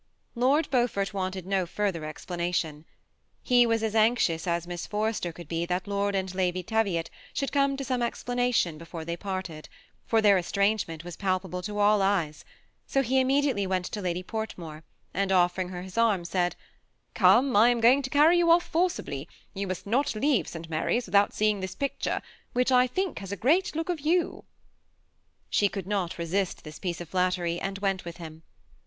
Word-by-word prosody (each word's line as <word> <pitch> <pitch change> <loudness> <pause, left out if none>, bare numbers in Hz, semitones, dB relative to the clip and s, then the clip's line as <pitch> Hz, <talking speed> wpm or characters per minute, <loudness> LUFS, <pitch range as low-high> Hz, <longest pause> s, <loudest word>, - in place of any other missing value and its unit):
*' - - -47
Lord 270 +6 +3
Beaufort 240 -6 +1
wanted 185 -2 -3
no 190 -2 0
further 185 -4 -2
explanation. 165 -1 -3 0.6
He 245 -2 +5
was 225 -1 +1
as 220 -1 -1
anxious 215 -7 +2
as 170 0 0
Miss 175 -1 -6
Forrester 210 -4 -1
could 170 -1 -11
be, 165 +2 -2
that 180 +1 -1
Lord 200 0 0
and 190 -1 -2
Lady 185 -1 0
Teviot 200 -5 0 0.2
should 275 - -1
come 275 -1 +2
to 275 - -4
some 255 -1 -1
explanation 245 -8 0
before 165 -1 -8
they 170 +1 -3
parted, 185 -4 -5 0.4
for 225 - +3
their 205 -3 +5
estrangement 200 -3 0
was 175 -1 -7
palpable 185 -1 -2
to 210 +2 -5
all 205 0 +4
eyes; 175 -7 0 0.4
so 270 - +1
he 260 +2 +2
immediately 265 -6 +2
went 185 -1 -1
to 210 - -5
Lady 180 -1 -2
Portmore 175 -8 -6 0.3
and 195 0 0
offering 180 0 +2
her 180 -1 -6
his 190 +4 -5
arm, 210 -7 +2
said, 175 0 0 0.6
^^ - - -44
Gome, 260 0 +5
I 220 +4 +7
am 240 -1 +2
going 245 +5 +5
to 260 - -5
carry 310 +5 +5
you 340 -1 +3
off 340 +1 +6
forcibly; 315 - -2 0.2
you 195 +1 -3
must 185 -1 -4
not 240 +4 +1
leave 245 - +1
St. 165 0 -7
Mary's 165 +9 0
without 200 +2 +3
seeing 215 -1 +1
this 190 -1 -5
picture, 280 -1 -2 0.3
which 250 +1 +2
I 250 0 +5
think 375 +9 -2
has 195 -1 -8
a 200 - -3
great 310 - +2
look 325 0 -2
of 345 -3 -1
you." 335 +5 0 1.1
She 205 - +3
could 195 -3 -5
not 190 -4 -2
resist 175 +3 -2
this 155 0 -10
piece 175 -3 -3
of 170 - -8
flattery, 180 -2 0
and 195 0 -3
went 195 -2 -1
with 170 0 -8
him. 160 -2 -9
195 Hz, 190 wpm, -27 LUFS, 175-240 Hz, 1.1 s, I